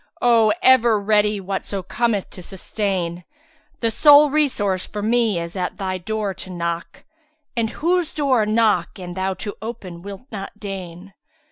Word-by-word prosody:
* - - -32
O 230 -3 +4
ever 240 -4 +5
ready 210 0 +2
whatso 195 0 -4
cometh 220 0 -1
to 185 - -10
sustain! 180 -2 -3 0.6
The 230 -1 +1
sole 290 +4 +7
resource 205 -11 +1
for 205 -1 -6
me 225 -4 +2
is 170 +1 -6
at 180 -1 -3
Thy 185 -2 -3
door 210 +1 -2
to 185 - -9
knock, 170 -1 -4 0.3
* 305 -2 -48
At 230 -2 0
whose 340 +6 0
door 270 -6 +2
knock 215 -6 +2
an 180 -2 -7
Thou 190 +1 -2
to 205 +2 -6
open 190 -6 -7
wilt 200 +3 -9
not 205 0 -7
deign? 190 -2 -7
205 Hz, 160 wpm, -21 LUFS, 185-230 Hz, 0.6 s, sole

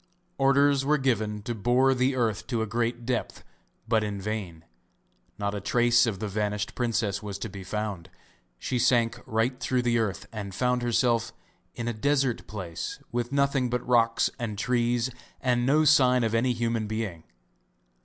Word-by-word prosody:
Orders 140 0 +4
were 150 +2 +3
given 110 -6 -1
to 120 - -3
bore 125 +5 +3
the 130 +1 +1
earth 110 -4 -1
to 115 -4 -1
a - - -1
great 120 +2 -2
depth, 125 -1 -3 0.4
but 110 -1 +2
in 105 -1 -3
vain; 95 -6 -5 0.7
not 100 0 -2
a 100 - -4
trace 120 +3 +3
of 105 -4 -2
the 105 - -4
vanished 105 0 -2
princess 115 -4 -1
was 100 -2 -5
to 115 - -5
be 100 -1 -8
found. 100 -3 -4 0.5
She 125 - -2
sank 120 -1 +2
right 115 +3 0
through 125 -1 0
the 120 -1 +2
earth 105 -5 -2
and 100 -4 -6
found 125 +1 +1
herself 120 -1 +1 0.4
in 120 - -4
a 120 - -1
desert 135 +1 0
place 95 -6 -5
with 120 +1 -2
nothing 140 -2 +1
but 125 0 -2
rocks 115 -2 +3
and 110 -4 -4
trees 120 +1 +1 0.3
and 125 -1 +1
no 155 +3 +4
sign 130 -4 +5
of 115 -1 0
any 125 +2 +2
human 115 -2 -1
being. 105 -7 -4
115 Hz, 170 wpm, -27 LUFS, 105-125 Hz, 0.7 s, sign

